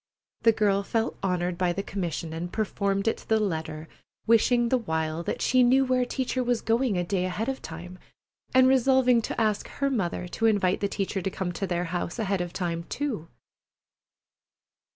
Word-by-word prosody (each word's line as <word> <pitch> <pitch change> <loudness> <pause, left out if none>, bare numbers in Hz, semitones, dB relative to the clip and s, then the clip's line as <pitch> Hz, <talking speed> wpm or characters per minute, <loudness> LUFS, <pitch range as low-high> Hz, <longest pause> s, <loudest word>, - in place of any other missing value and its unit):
The 230 - +6
girl 205 -2 +2
felt 225 +2 -2
honored 180 -2 -1
by 180 -1 +2
the 195 +3 -3
commission, 170 -5 -4
and 170 +2 -4
performed 200 -1 -1
it 225 - +2
to - - -15
the 220 0 +4
letter, 160 -5 -3 0.4
wishing 235 +1 +4
the 255 - +3
while 160 -5 -2
that - - -3
she 255 0 +4
knew 260 +2 +5
where 255 -1 +2
Teacher 255 0 -1
was 245 -1 0
going 230 -3 +1
a 175 - +1
day 180 +1 -1
ahead 205 +5 -2
of 270 0 -3
time, 175 +3 -9 0.5
and 260 0 +6
resolving 260 -2 +4
to - - -4
ask 215 -2 +1
her 275 -1 -2
mother 180 -6 -1
to 225 +5 +1
invite 200 -4 +2
the 200 - 0
teacher 195 -1 -2
to 195 - -1
come 190 -1 -3
to 195 +2 -3
their 175 -1 -1
house 175 +2 -3
ahead 200 -4 0
of 175 -1 -4
time, 170 -2 -3
too. 250 - -3
200 Hz, 190 wpm, -27 LUFS, 175-240 Hz, 0.5 s, The